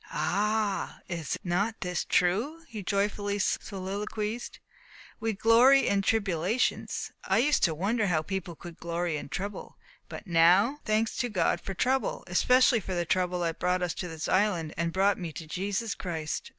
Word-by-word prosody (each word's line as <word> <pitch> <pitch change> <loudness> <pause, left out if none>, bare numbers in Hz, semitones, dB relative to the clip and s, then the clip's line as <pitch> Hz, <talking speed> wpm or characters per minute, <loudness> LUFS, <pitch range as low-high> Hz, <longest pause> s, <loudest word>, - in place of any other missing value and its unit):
"Ah! 205 +6 -1
is 165 -4 -3
not 200 +5 -1
this 180 -2 -1
true?" 230 - +1
he 220 -5 -7
joyfully 200 +1 -1
soliloquized. 210 +3 -3 0.6
"We 225 0 -1
glory 235 +6 +5
in 200 0 +2
tribulations. 200 +1 0
I - - +2
used 290 +6 +3
to 165 -3 0
wonder 210 +6 0
how 160 -4 +1
people 185 -2 -4
could 170 +1 -11
glory 170 -1 -2
in 145 - -7
trouble. 200 +5 -5 0.3
But - - -8
now, 180 - +4
thanks 215 +1 +1
to 245 - -1
God 180 -4 +1
for 195 - -6
trouble! 260 +6 0
especially 250 +6 +4
for 190 -2 -5
the 175 0 0
trouble 180 +1 0
that 165 -1 -2
brought 180 0 +1
us 175 - -1
to 180 - -5
this 160 -2 -5
island, 185 -6 +1
and 170 +1 -1
brought 195 +3 +2
me 170 -3 -4
to 160 - -7
Jesus 200 +6 -2
Christ! 160 -4 -4
195 Hz, 165 wpm, -28 LUFS, 175-215 Hz, 0.6 s, glory